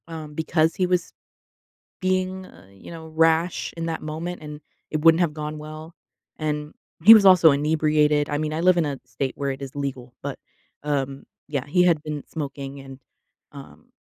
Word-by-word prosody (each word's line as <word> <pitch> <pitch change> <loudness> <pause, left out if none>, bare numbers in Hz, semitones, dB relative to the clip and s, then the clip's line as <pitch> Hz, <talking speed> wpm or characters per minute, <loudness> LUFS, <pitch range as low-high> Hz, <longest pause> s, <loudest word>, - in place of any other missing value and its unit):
um, 155 -2 -8
because 160 0 +1
he 185 - 0
was 180 -1 -1 0.9
being, 185 0 -1
uh, - - -17
you 100 - -13
know, 160 -1 -9
rash 165 +2 +1
in 165 - -3
that 160 - -3
moment, 160 +3 -5
and 150 0 -9 0.3
it 155 - -1
wouldn't 165 +1 +6
have 160 -3 +1
gone 150 0 -5
well. 155 +2 -9 0.4
And 150 -1 -3 0.3
he 220 +5 +11
was 215 -3 +6
also 180 -4 +7
inebriated, 150 0 +2
I 145 - -1
mean, 155 0 -2
I 160 - -2
live 185 0 +4
in 165 - +2
a 140 -2 -4
state 130 +2 -4
where 140 -1 -1
it 135 +1 -7
is 135 -1 -7
legal, 130 -3 -5
but, - - -5 0.5
um, 140 -2 -2 0.2
yeah, 140 -3 -3
he 180 +5 +2
had 170 -4 +3
been 150 -2 -5
smoking, 140 -2 -6
and, 135 0 -12 0.5
um, - - -13
155 Hz, 185 wpm, -23 LUFS, 145-165 Hz, 0.9 s, he